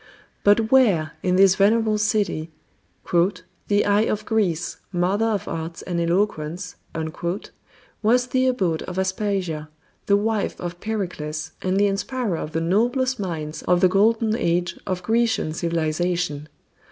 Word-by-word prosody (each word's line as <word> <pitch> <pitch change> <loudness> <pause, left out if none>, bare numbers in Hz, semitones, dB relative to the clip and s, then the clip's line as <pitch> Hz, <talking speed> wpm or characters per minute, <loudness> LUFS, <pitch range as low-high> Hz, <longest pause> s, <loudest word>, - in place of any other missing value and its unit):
But 220 +2 +4
where, 205 -13 +4
in 180 0 +1
this 190 0 +6
venerable 215 +2 +3
city 205 -7 0 1.2
"the 205 0 +2
eye 205 +1 +3
of 215 0 -2
Greece, 180 -7 0
mother 190 +5 +1
of 210 -4 -1
arts 165 0 -5
and 175 -2 -2
eloquence" 175 -1 -1 1.3
was 245 +3 +3
the 255 +1 +1
abode 185 -11 0
of 180 - -6
Aspasia, 190 -5 -1 0.4
the 200 - +5
wife 215 0 -1
of 175 0 -5
Pericles 160 -8 -4
and 185 +1 0
the 205 - +4
inspirer 205 0 -1
of 155 - -5
the 165 - 0
noblest 245 +8 +1
minds 160 -5 -4
of 180 0 +2
the 185 - +6
Golden 220 +3 +3
Age 175 -4 0
of 180 -1 -2
Grecian 225 -6 +1
civilization? 165 -1 -1
190 Hz, 135 wpm, -23 LUFS, 170-215 Hz, 1.3 s, this